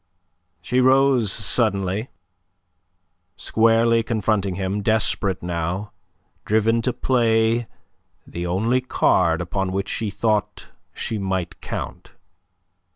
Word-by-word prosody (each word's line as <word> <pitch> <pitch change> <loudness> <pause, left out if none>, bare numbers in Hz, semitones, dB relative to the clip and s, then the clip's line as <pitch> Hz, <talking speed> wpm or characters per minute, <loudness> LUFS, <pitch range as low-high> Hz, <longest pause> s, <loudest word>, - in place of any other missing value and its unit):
She 125 +1 +1
rose 130 -4 +4
suddenly, 105 -1 0 1.3
squarely 115 +1 +3
confronting 110 -4 -1
him, 95 +2 -2
desperate 100 -3 0
now, 90 +4 -3 0.5
driven 110 +2 +2
to 125 - 0
play 115 -2 +1 0.6
the 85 +1 -5
only 110 +8 +1
card 130 - +2
upon 95 -1 -2
which 95 +1 -2
she 110 -2 -2
thought 105 +1 -1 0.2
she 110 - -4
might 95 -3 -3
count. - - -7
110 Hz, 95 wpm, -22 LUFS, 95-115 Hz, 1.3 s, rose